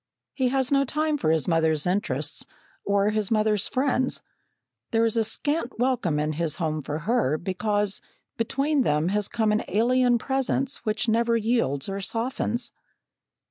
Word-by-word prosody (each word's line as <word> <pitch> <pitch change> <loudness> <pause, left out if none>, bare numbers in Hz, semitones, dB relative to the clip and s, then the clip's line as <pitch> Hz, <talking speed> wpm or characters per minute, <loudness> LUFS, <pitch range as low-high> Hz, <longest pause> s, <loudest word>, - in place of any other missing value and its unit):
He 260 -2 +1
has 265 0 +1
no 275 0 +4
time 305 +3 0
for 155 - +1
his 160 -2 +1
mother's 160 -3 +1
interests 200 +5 -1 0.4
or 200 +1 +2
his 215 -2 -1
mother's 215 -2 +2
friends; 260 -1 +1 0.7
there 225 -1 +2
is 225 - +1 0.2
scant 290 -4 -1
welcome 240 - +1
in 150 +1 0
his 155 0 -1
home 155 -3 -2
for 150 +2 -4
her, 165 - +1
because 205 +3 -1 0.3
between 275 +5 0
them 155 -6 +1
has 205 +1 +1
come 220 -2 0
an 210 - +2
alien 245 +4 +3
presence 270 +2 0
which 215 0 -2
never 230 +1 +2
yields 220 - 0
or 195 0 -4
softens. 235 +2 -2
220 Hz, 150 wpm, -25 LUFS, 180-250 Hz, 0.7 s, no